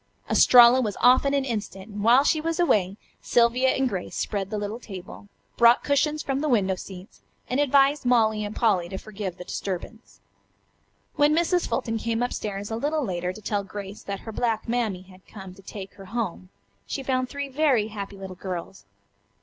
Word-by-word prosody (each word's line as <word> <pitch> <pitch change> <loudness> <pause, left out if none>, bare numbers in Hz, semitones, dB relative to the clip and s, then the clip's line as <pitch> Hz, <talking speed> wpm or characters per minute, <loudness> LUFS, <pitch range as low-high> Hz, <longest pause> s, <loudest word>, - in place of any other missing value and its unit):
Estralla 245 +1 +7
was 210 -5 -3
off 250 +3 +5
in 280 - +1
an 275 -1 0
instant, 205 -5 -5
and 205 0 -5
while 245 +5 +6
she 310 +1 +2
was 330 +1 -2
away 200 - +2 0.2
Sylvia 240 +2 +3
and 265 0 +1
Grace 190 -6 -5
spread 195 -2 -2
the 215 - -3
little 205 +3 -4
table, 195 -2 -10 0.3
brought 235 +1 +5
cushions 300 +2 +1
from 270 0 -1
the 305 +1 -1
window 200 -6 +2
seats 185 +1 -10 0.3
and 255 - -1
advised 280 0 +3
Molly 220 -4 +2
and 205 +1 -5
Polly 190 -7 +1
to 190 - -5
forgive 195 -3 -6
the 180 - -8
disturbance. 185 - -6 1.0
When 295 +1 +4
Mrs. 345 +1 +1
Fulton 225 -2 -2
came 230 +1 -1
up 245 - -2
stairs 205 0 -5
a - - -1
little 295 +3 -1
later 180 -2 -2
to 215 - -11
tell 205 0 -1
Grace 200 +1 -8
that 200 -1 -6
her 220 - -8
black 225 0 -1
Mammy 225 -6 -1
had 185 0 -19
come 190 -3 -10
to 195 - -16
take 195 0 -9
her 195 0 -13
home 200 -4 -4 0.4
she 275 - -4
found 255 -1 -1
three 285 0 -4
very 265 -6 +1
happy 200 -2 -7
little 190 -1 -8
girls. 180 - -7
220 Hz, 190 wpm, -25 LUFS, 195-255 Hz, 1.0 s, Estralla